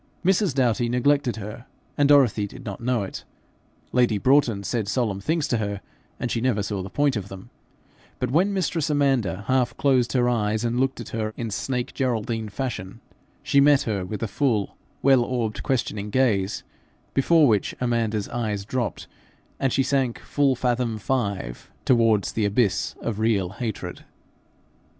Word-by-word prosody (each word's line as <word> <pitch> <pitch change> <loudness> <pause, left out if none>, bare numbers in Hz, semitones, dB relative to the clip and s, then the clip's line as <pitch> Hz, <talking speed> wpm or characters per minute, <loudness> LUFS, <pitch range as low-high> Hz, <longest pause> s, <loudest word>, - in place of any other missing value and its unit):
Mrs. 190 -5 +2
Doughty 120 -2 +2
neglected 130 +1 +2
her, 110 +3 -8 0.3
and 145 0 +3
Dorothy 125 -8 +4
did - - -12
not 100 -1 -6
know 120 -3 0
it; 95 - -7 0.7
lady 120 -4 +3
Broughton 125 -3 +3
said 110 -1 -2
solemn 100 -3 -1
things 160 +5 0
to 120 - +2
her, 100 -2 -3 0.4
and 120 - -2
she 115 - -1
never 115 -5 +1
saw 100 -1 -3
the 95 - -6
point 145 +2 +1
of 100 -3 -4
them; 95 -1 -11 0.7
but 125 -1 -2
when 180 +8 +3
mistress 175 -5 -1
Amanda 135 - +1
half 130 0 +1
closed 130 -4 +2
her 125 -2 +3
eyes 110 -1 0
and 120 +1 0
looked 135 -1 0
at 120 - -7
her 110 -1 -3
in 115 -2 -4
snake 125 +3 -2
Geraldine 115 -3 -1
fashion, 110 -5 -5 0.4
she 140 - +4
met 145 -1 +5
her 100 -4 -2
with 105 +4 -5
a - - 0
full, 110 -4 0 0.3
wide 135 -1 +6
orbed, 120 -3 -2
questioning 105 -5 -2
gaze, 105 -6 +1 0.5
before 155 +2 +4
which 105 -4 +1
Amanda's 115 -4 0
eyes 105 -4 -2
dropped, 120 -4 -3 0.5
and 135 - +1
she 135 - +2
sank 130 -3 0
full 140 -2 +1
fathom 120 -2 0
five 100 - -3 0.2
towards 115 -5 +3
the 110 - 0
abyss 100 0 +1
of 110 -3 -3
real 105 -5 +1
hatred. 110 +2 -5
120 Hz, 165 wpm, -24 LUFS, 105-130 Hz, 0.7 s, wide